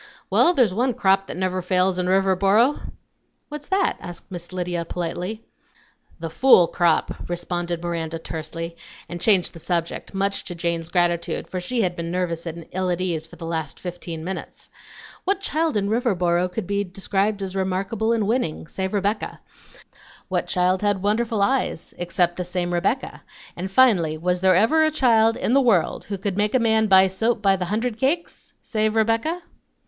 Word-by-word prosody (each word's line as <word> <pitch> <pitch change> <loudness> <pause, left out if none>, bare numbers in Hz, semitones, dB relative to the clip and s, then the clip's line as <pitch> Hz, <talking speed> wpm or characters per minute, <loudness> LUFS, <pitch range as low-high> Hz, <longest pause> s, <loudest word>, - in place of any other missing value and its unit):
"Well, 350 - +4
there's 235 -9 +3
one 245 +3 0
crop 195 -4 +2
that - - -6
never 185 0 -1
fails 185 +1 +1
in 180 - 0
Riverboro!" 195 +7 +3 0.6
"What's 295 -1 -7
that?" 385 0 +1
asked 175 +1 -10
Miss 175 -1 -7
Lydia 180 -2 -2
politely. 180 +6 -4 0.8
"The 165 -1 -5
fool 220 -3 +6
crop," 170 -1 0
responded 175 -1 -3
Miranda 165 -1 -3
tersely, 165 +1 -6 0.3
and 175 0 -7
changed 195 -5 +3
the 165 - -10
subject, 170 +3 -3
much 195 +1 0
to 175 - -5
Jane's 170 -1 -2
gratitude, 175 -1 0
for 185 - -4
she 235 +5 -1
had 175 -2 -1
been 170 -1 -4
nervous 175 -1 -2
and 165 0 -6
ill 185 0 -1
at 175 -1 -1
ease 165 -4 -2
for 170 - -14
the 165 0 -8
last 160 -3 -4
fifteen 175 -2 -6
minutes. 190 +3 -7 0.5
What 395 0 +1
child 320 - 0
in 200 -1 0
Riverboro 180 -6 +1
could 210 +1 -4
be 200 +2 0
described 195 +2 -1
as 190 0 -5
remarkable 195 +4 -1
and 225 -3 +1
winning, 220 -9 -1
save 190 +4 -3
Rebecca? 205 +2 -1 0.9
What - - -1
child 180 0 +1
had 205 -2 0
wonderful 215 0 +1
eyes, 255 -7 -1
except 175 0 0
the 180 - -2
same 175 0 -2
Rebecca? 195 +10 -1 0.3
and 185 +2 -4
finally, 190 -9 +4
was 180 +2 -1
there 190 -1 +5
ever 230 - +4
a 310 - +4
child 230 -7 +3
in 235 - 0
the 275 - +5
world 220 -10 +2
who 200 - -4
could 195 0 -3
make 210 +3 +1
a - - +5
man 220 -1 +3
buy 190 -1 +7
soap 215 +4 0
by 195 -1 +4
the 180 -1 -3
hundred 220 +4 -2
cakes, 315 +7 -2
save 215 -1 0
Rebecca? 230 +11 +1
190 Hz, 175 wpm, -23 LUFS, 175-220 Hz, 0.9 s, buy